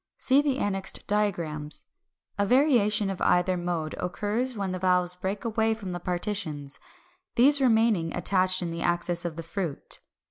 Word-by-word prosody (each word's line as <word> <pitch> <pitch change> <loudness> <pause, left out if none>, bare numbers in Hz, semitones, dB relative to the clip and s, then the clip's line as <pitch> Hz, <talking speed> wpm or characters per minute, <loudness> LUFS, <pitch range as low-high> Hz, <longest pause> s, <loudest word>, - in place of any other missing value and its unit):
See 270 +2 +4
the 285 -3 0
annexed 195 -5 -1
diagrams. 170 -8 -2 0.5
A 205 - +1
variation 215 -5 +3
of 190 - -6
either 180 +1 +3
mode 175 -3 -3
occurs 215 +7 -2
when 195 -2 -2
the 185 - -3
valves 180 -1 +2
break 190 +4 -4
away 220 0 +1
from 200 -4 -7
the 175 - -4
partitions, 175 -6 -3 0.6
these 280 +4 +5
remaining 220 -9 +3
attached 185 +1 +2
in 170 - -3
the 170 0 -5
axis 175 0 0
of 170 -2 -3
the 165 - -6
fruit. 165 -3 -3
190 Hz, 155 wpm, -27 LUFS, 175-220 Hz, 0.6 s, these